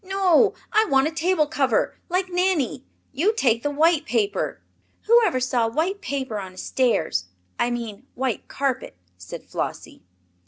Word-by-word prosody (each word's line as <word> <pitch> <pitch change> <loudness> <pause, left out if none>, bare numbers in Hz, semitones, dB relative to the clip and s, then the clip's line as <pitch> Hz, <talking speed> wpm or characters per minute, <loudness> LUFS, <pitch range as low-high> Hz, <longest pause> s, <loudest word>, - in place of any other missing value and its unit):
"No, 380 -3 +3 0.2
I 435 +1 +5
want 270 -6 +3
a - - -3
table 330 0 +1
cover, 275 -5 +1 0.2
like 365 +2 0
Nanny. 355 -8 0 0.3
You 360 +11 +1
take 235 - +2
the 290 - -1
white 315 +2 +3
paper." 210 -4 -1 0.4
"Whoever 440 - +4
saw 250 -2 +1
white 355 - -1
paper 265 - -3
on 190 -2 -8
a - - -19
stairs 185 - 0 0.3
I 240 - +2
mean 235 0 -5
white 255 -3 -2
carpet," 265 - -3 0.2
said 90 -1 -9
Flossie. - - -5
275 Hz, 150 wpm, -23 LUFS, 240-355 Hz, 0.4 s, I